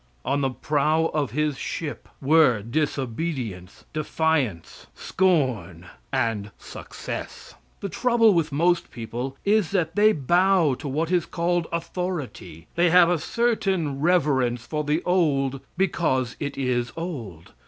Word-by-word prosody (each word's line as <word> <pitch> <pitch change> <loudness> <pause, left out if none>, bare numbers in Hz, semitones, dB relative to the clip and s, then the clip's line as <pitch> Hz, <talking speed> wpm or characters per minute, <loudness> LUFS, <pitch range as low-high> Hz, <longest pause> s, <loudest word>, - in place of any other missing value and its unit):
On 140 +1 0
the 135 - +1
prow 155 +4 +1
of 150 -4 0
his 150 -1 -1
ship 155 -3 -5
were 135 -7 +4
disobedience, 130 - -3
defiance, 155 - -1
scorn 130 - 0 0.3
and 115 -6 -1
success. - - -8 0.3
The 200 - -3
trouble 230 +3 +3
with 165 -3 +1
most 170 +5 +1
people 120 +3 -5
is 205 -3 +3
that 175 -4 -1
they 210 +1 +5
bow 175 0 +3
to 150 - -6
what 155 +5 -1
is 175 -3 +1
called 175 -1 0
authority; 170 - -4
they 175 +1 +3
have 175 0 +6
a 175 - +1
certain 195 - 0
reverence 135 -8 +2
for 150 -1 -2
the 150 +3 0
old 140 -7 +1 0.2
because 155 -9 0
it 145 -1 -4
is 125 -2 -1
old. 120 - -6
150 Hz, 130 wpm, -24 LUFS, 130-175 Hz, 0.3 s, have